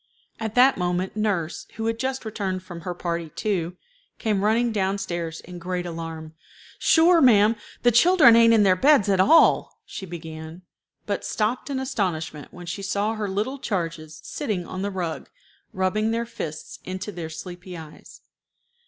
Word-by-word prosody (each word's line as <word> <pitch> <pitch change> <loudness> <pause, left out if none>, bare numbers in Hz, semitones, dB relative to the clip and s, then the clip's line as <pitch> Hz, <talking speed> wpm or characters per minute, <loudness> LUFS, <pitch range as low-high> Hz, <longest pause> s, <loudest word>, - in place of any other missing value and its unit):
At 220 -1 -4
that 255 -2 +5
moment 180 +2 -1
nurse, 200 -7 -2
who 225 - -4
had 225 0 -1
just 265 -1 -2
returned 195 -4 -3
from 175 -2 -9
her 175 +1 -5
party 170 -2 -3
too, 180 -1 -2 0.4
came 210 -4 0
running 230 +3 +2
down 195 -2 0
stairs 170 -4 -4
in 180 0 -10
great 180 +1 -3
alarm. 165 -2 -6 0.5
"Sure, 335 +1 +5
ma'am, 220 -3 +6 0.3
the 240 - +5
children 300 0 +7
ain't 230 0 +6
in 220 -2 +5
their 190 -2 +5
beds 270 0 +4
at 190 -2 +2
all," 320 - +4
she 190 - -8
began, 160 0 -8 0.4
but 205 - -2
stopped 225 +6 -1
in 270 -2 -2
astonishment 170 - -3
when 175 0 -10
she 180 +4 -5
saw 200 +3 -1
her 215 -2 -3
little 215 +8 -2
charges 165 -8 -4
sitting 210 -11 -3
on 185 - -6
the 200 - -1
rug, 180 -4 -4 0.4
rubbing 190 +4 0
their 230 +1 -1
fists 165 -10 -7
into 185 +3 -5
their 170 -4 -6
sleepy 180 +2 -8
eyes. 155 -2 -12
190 Hz, 165 wpm, -24 LUFS, 175-225 Hz, 0.5 s, children